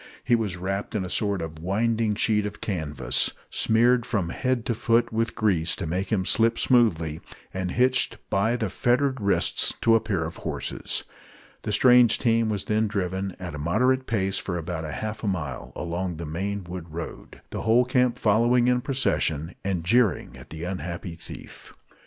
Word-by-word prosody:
He -, -, +1 dB
was 105 Hz, -6 st, -2 dB
wrapped 95 Hz, +4 st, -3 dB
in 95 Hz, -3 st, -1 dB
a 90 Hz, -, -7 dB
sort 100 Hz, -5 st, 0 dB
of 80 Hz, -1 st, -7 dB
winding 110 Hz, +4 st, 0 dB
sheet 105 Hz, -1 st, +1 dB
of 105 Hz, -, -9 dB
canvas, 80 Hz, -7 st, -1 dB, 0.2 s
smeared 120 Hz, +2 st, +3 dB
from 100 Hz, -8 st, -1 dB
head 125 Hz, +3 st, -1 dB
to 120 Hz, -, 0 dB
foot 115 Hz, +1 st, +1 dB
with 115 Hz, +1 st, -1 dB
grease 95 Hz, -8 st, +1 dB
to -, -, -5 dB
make 90 Hz, +4 st, -2 dB
him 95 Hz, -4 st, +1 dB
slip 115 Hz, +3 st, +3 dB
smoothly, 85 Hz, -11 st, +2 dB, 0.3 s
and 95 Hz, -1 st, -2 dB
hitched 130 Hz, +5 st, +2 dB
by 110 Hz, +5 st, +2 dB
the 110 Hz, -6 st, -2 dB
fettered 130 Hz, +1 st, +1 dB
wrists 100 Hz, -1 st, +1 dB
to 115 Hz, -, +4 dB
a 115 Hz, -, +6 dB
pair 105 Hz, -7 st, -2 dB
of 80 Hz, -, -7 dB
horses. -, -, -2 dB, 0.6 s
The -, -, -3 dB
strange 125 Hz, -2 st, +6 dB
team 115 Hz, -2 st, +2 dB
was 105 Hz, -3 st, -1 dB
then 110 Hz, +1 st, +1 dB
driven, 95 Hz, -1 st, -2 dB
at 90 Hz, -4 st, -6 dB
a 75 Hz, -, -6 dB
moderate 125 Hz, -, +1 dB
pace, 95 Hz, -3 st, 0 dB
for 85 Hz, -3 st, -3 dB
about 80 Hz, -2 st, -4 dB
half 110 Hz, +7 st, -5 dB
a -, -, -1 dB
mile 75 Hz, -9 st, -3 dB
along 85 Hz, 0 st, -3 dB
the 85 Hz, -, -5 dB
main 95 Hz, +6 st, -3 dB
wood 85 Hz, -2 st, -8 dB
road, 85 Hz, -, -8 dB
the -, -, -4 dB
whole 115 Hz, +3 st, +4 dB
camp 125 Hz, -1 st, +2 dB
following 120 Hz, +3 st, +3 dB
in 125 Hz, 0 st, +3 dB
procession, 85 Hz, -, 0 dB
and 95 Hz, -4 st, -1 dB
jeering 115 Hz, +2 st, +2 dB
at -, -, -13 dB
the 80 Hz, +1 st, -7 dB
unhappy 90 Hz, -1 st, -5 dB
thief. 85 Hz, -, -11 dB
100 Hz, 180 wpm, -25 LUFS, 90-115 Hz, 0.6 s, a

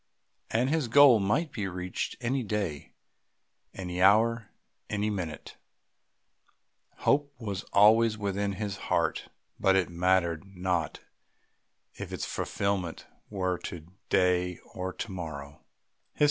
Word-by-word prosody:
And 125 Hz, +4 st, +1 dB
his 160 Hz, -5 st, +1 dB
goal 130 Hz, -1 st, +7 dB
might 130 Hz, +11 st, 0 dB
be 105 Hz, -3 st, -3 dB
reached 90 Hz, 0 st, -4 dB
any 130 Hz, +2 st, 0 dB
day, 100 Hz, -, -3 dB, 0.8 s
any 90 Hz, -1 st, -5 dB
hour, 110 Hz, +3 st, +4 dB, 0.4 s
any 105 Hz, 0 st, -1 dB
minute. 90 Hz, -6 st, -5 dB, 1.4 s
Hope 145 Hz, 0 st, +2 dB
was 100 Hz, -4 st, -4 dB
always 110 Hz, +2 st, +5 dB
within 100 Hz, -1 st, -1 dB
his 100 Hz, 0 st, -4 dB
heart; -, -, 0 dB, 0.3 s
but 95 Hz, 0 st, +4 dB
it 95 Hz, -2 st, +2 dB
mattered 85 Hz, -2 st, +1 dB
not 90 Hz, -4 st, -2 dB, 0.9 s
if -, -, -8 dB
its -, -, -3 dB
fulfilment 100 Hz, -4 st, -2 dB, 0.2 s
were 95 Hz, -3 st, -1 dB
to 85 Hz, -1 st, -8 dB, 0.2 s
day 90 Hz, -1 st, +2 dB, 0.2 s
or 95 Hz, 0 st, -3 dB
to 100 Hz, +3 st, -6 dB
morrow. 75 Hz, -6 st, -7 dB
95 Hz, 115 wpm, -29 LUFS, 90-110 Hz, 1.4 s, goal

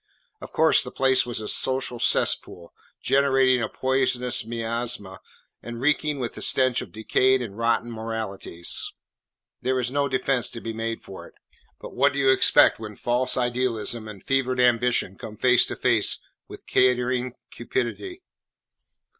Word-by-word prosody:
Of -, -, -10 dB
course, -, -, +4 dB
the -, -, -5 dB
place 130 Hz, -1 st, +2 dB
was 120 Hz, -2 st, -3 dB
a 105 Hz, -, -6 dB
social 130 Hz, -2 st, 0 dB
cesspool, 85 Hz, -5 st, 0 dB, 0.3 s
generating 135 Hz, -2 st, +3 dB
a 110 Hz, -, -2 dB
poisonous 130 Hz, -2 st, 0 dB
miasma 115 Hz, -4 st, -3 dB, 0.4 s
and 120 Hz, 0 st, -8 dB
reeking 150 Hz, +2 st, 0 dB
with 125 Hz, -3 st, -4 dB
the -, -, -10 dB
stench 130 Hz, -2 st, +2 dB
of -, -, -10 dB
decayed 130 Hz, +4 st, +1 dB
and 115 Hz, -6 st, -7 dB
rotten 115 Hz, +1 st, 0 dB
moralities. 110 Hz, -6 st, -2 dB, 0.7 s
There 130 Hz, 0 st, 0 dB
is 125 Hz, 0 st, -2 dB
no 140 Hz, +1 st, 0 dB
defence 130 Hz, -1 st, 0 dB
to 115 Hz, -, -6 dB
be 115 Hz, 0 st, -6 dB
made 115 Hz, 0 st, -4 dB
for 95 Hz, -, -11 dB
it. -, -, -21 dB, 0.4 s
But -, -, -10 dB
what 140 Hz, +2 st, +2 dB
do -, -, -5 dB
you 135 Hz, -1 st, +4 dB
expect 130 Hz, -, +4 dB
when 105 Hz, -1 st, -8 dB
false 125 Hz, +4 st, -1 dB
idealism 120 Hz, -3 st, -1 dB
and 105 Hz, -3 st, -11 dB
fevered 130 Hz, -1 st, 0 dB
ambition 120 Hz, -5 st, +2 dB
come 110 Hz, -1 st, -9 dB
face 125 Hz, +1 st, +4 dB
to -, -, -4 dB
face -, -, +2 dB, 0.3 s
with -, -, -12 dB
catering 125 Hz, 0 st, +1 dB, 0.2 s
cupidity? 130 Hz, -, -4 dB
125 Hz, 155 wpm, -24 LUFS, 115-130 Hz, 0.7 s, course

